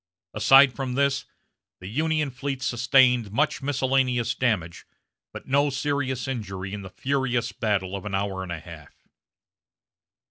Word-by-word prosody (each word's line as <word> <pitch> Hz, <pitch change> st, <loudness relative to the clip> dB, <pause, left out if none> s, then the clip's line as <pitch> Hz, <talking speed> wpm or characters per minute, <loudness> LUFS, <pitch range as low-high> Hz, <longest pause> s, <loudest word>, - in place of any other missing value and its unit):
Aside 135 Hz, +5 st, +6 dB
from 125 Hz, +1 st, -4 dB
this, 140 Hz, 0 st, +1 dB, 0.5 s
the 90 Hz, -, -12 dB
Union 155 Hz, +6 st, -1 dB
fleet 135 Hz, 0 st, -4 dB
sustained 125 Hz, -2 st, +3 dB
much 145 Hz, +8 st, 0 dB
miscellaneous 130 Hz, -3 st, +1 dB
damage, 100 Hz, -10 st, -2 dB, 0.4 s
but -, -, -9 dB
no 140 Hz, +2 st, +2 dB
serious 135 Hz, -2 st, -2 dB
injury 95 Hz, -7 st, -5 dB
in 105 Hz, -, -5 dB
the 95 Hz, -, -9 dB
furious 130 Hz, +1 st, -1 dB
battle 100 Hz, -3 st, -1 dB
of 95 Hz, -, -6 dB
an 100 Hz, -2 st, -3 dB
hour 95 Hz, -1 st, -2 dB
and 95 Hz, -2 st, -6 dB
a 85 Hz, -, -4 dB
half. 80 Hz, -2 st, -14 dB
125 Hz, 140 wpm, -25 LUFS, 100-135 Hz, 0.5 s, Aside